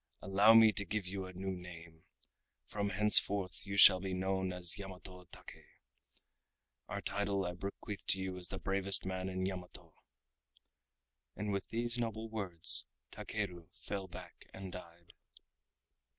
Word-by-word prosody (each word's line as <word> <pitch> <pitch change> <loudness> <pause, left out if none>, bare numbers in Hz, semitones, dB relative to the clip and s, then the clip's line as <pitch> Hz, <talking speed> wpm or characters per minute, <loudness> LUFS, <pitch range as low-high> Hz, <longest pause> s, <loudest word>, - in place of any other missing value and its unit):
Allow 100 +4 +4
me 110 -1 +7
to 105 -1 +2
give 105 -1 -4
you 95 0 -5
a 95 - -11
new 95 +1 -5
name. 85 -2 -12 0.6
From 100 -1 -3
henceforth 100 -2 +4
you 100 0 -4
shall 95 -2 +9
be 95 0 -4
known 95 0 -2
as 90 +2 -1
Yamato 90 -1 -9
Take. - - -13 1.2
Our - - -5
title 100 -1 -1
I 90 - -4
bequeath 100 +2 -8
to 95 - +3
you 95 -1 -4
as 90 - -4
the 95 - -6
bravest 95 +2 +1
man 95 0 -4
in 95 0 -3
Yamato." 90 -2 -8 1.4
And 105 0 -4
with 100 -1 -3
these 120 +1 -1
noble 115 -1 -4
words, 95 -7 +3 0.2
Takeru 85 -2 -6
fell 95 -2 -6
back 85 - -13
and 95 -1 -8
died. 85 -1 -13
95 Hz, 145 wpm, -34 LUFS, 90-100 Hz, 1.4 s, shall